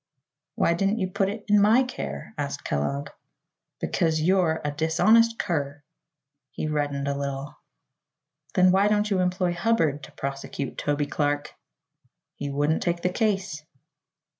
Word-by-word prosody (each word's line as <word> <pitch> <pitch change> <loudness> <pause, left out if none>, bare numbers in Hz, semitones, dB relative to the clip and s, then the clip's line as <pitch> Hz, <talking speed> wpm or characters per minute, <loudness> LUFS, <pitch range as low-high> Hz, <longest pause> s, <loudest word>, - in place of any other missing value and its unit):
"Why 170 - +2
didn't 195 +5 +1
you 185 -4 -2
put 195 0 +1
it 210 +1 -6
in 210 -1 +5
my 220 +6 +5
care?" 70 - -6
asked - - -4
Kellogg. 70 -1 -2 0.7
"Because 160 -2 0
you're 170 -1 +2
a 145 - 0
dishonest 215 +10 +3
cur." 145 -3 -2 0.7
He - - -4
reddened 145 -2 -1
a 140 - 0
little. 140 0 -5 1.0
"Then 185 0 +6
why 195 +2 +4
don't 210 0 +1
you 190 - +2
employ 180 -1 +1
Hubbard 170 -7 +1
to 135 - -11
prosecute 135 0 -5
Toby 145 0 0
Clark?" 145 0 -1 0.8
"He 145 - -5
wouldn't 145 +3 +1
take 170 -1 -1
the 180 - +2
case." 195 -7 -1
160 Hz, 140 wpm, -25 LUFS, 145-195 Hz, 1.0 s, Then